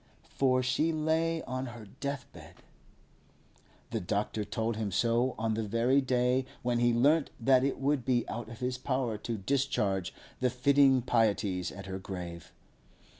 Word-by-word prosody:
For 130 -1 +2
she 150 +6 +1
lay 160 +1 0
on 130 +1 -4
her 120 -2 -9
deathbed. 135 +4 -7 1.3
The - - -1
doctor 105 +3 -2
told 110 +2 -2
him 105 -2 -2
so 120 +5 +1
on 110 0 0
the 110 - -1
very 115 +6 +2
day 125 0 +1 0.2
when 120 0 +1
he 120 0 +4
learnt 140 +6 +3
that 130 +2 +4
it 140 - 0
would 140 -1 +1
be 120 -1 +1
out 115 -1 -5
of 115 0 -10
his 125 0 -2
power 130 -5 -1
to 115 +1 -3
discharge 100 -5 0 0.3
the 125 - +2
fitting 135 0 +4
pieties 100 -6 +1
at 100 -1 -9
her 95 0 -5
grave. 90 -3 -7
120 Hz, 155 wpm, -30 LUFS, 110-135 Hz, 1.3 s, he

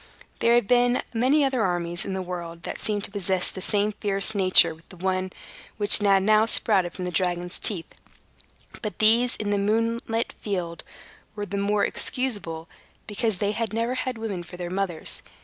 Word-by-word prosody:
There 235 +1 +4
have 240 - +3
been 245 0 +3
many 265 +6 +3
other 265 -3 0
armies 175 -1 -1
in 195 - -4
the 190 0 -3
world 170 -2 -7
that - - -6
seemed 205 -2 -1
to - - -3
possess 190 -2 0
the 190 - -8
same 205 +2 +1
fierce 205 0 +1
nature 185 -4 +5
with 160 +1 -21
the 185 - -13
one 185 +1 -2 0.5
which 205 0 +7
had 195 -2 +3
now 215 +2 +4
sprouted 190 -6 +2
from 180 - -5
the 180 - -3
dragon's 175 0 -1
teeth; 180 -6 -1 1.0
but 215 -2 -5
these, 230 +3 +3
in 205 -1 -3
the 205 - +1
moonlit 230 +2 -1
field, 175 -5 -4 0.5
were 205 -1 -4
the 200 - -6
more 200 +1 +1
excusable, 205 -11 -3 0.4
because 220 -1 -1
they 205 +2 -1 0.2
never 230 +3 -1
had 255 -1 -3
women 215 -5 -4
for 175 +1 -11
their 175 -1 -5
mothers. 185 -4 -2
200 Hz, 180 wpm, -25 LUFS, 180-225 Hz, 1.0 s, which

